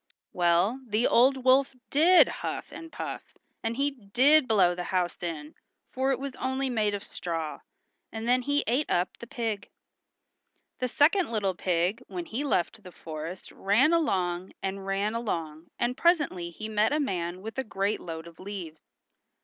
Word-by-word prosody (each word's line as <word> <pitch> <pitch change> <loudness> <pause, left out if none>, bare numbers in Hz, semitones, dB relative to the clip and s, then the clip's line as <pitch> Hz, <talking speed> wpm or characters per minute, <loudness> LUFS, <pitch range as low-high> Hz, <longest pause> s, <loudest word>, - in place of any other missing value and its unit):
Well, 175 +7 +2
the 220 +2 +1
old 260 +2 +4
wolf 265 +1 +4 0.2
did 340 +6 +7
huff - - -4
and 330 -1 -9
puff, - - -7 0.2
and 225 +1 -2
he 285 +1 +1
did 260 +5 +3
blow 190 -5 +4
the 175 0 -5
house 180 -2 -1
in, 160 -3 -5 0.4
for 265 +1 0
it 265 - +1
was 275 0 -6
only 260 0 -1
made 210 -3 +1
of 200 - -6
straw, 165 -3 -4 0.5
and 225 +1 -5
then 250 +1 +4
he 285 +3 +1
ate 255 +6 0
up 175 +1 0
the 235 - -9
pig. 225 -4 -3 1.1
The 255 - 0
second 320 +9 +3
little 200 -4 0
pig 180 +5 0
when 350 -2 -5
he 270 -1 -3
left 225 -5 0
the 185 - -12
forest 160 +2 -7
ran 235 +11 +3
along 185 - 0
and 195 0 -3
ran 200 +2 0
along 165 -9 -3
and 240 +1 0
presently 290 - +2
he 215 +6 -7
met 215 0 +2
a 300 - +1
man 180 - -2
with 225 +4 -5
a - - 0
great 205 -2 -1
load 165 -1 -7
of 170 -1 -14
leaves. 185 -5 -7
215 Hz, 170 wpm, -28 LUFS, 180-260 Hz, 1.1 s, did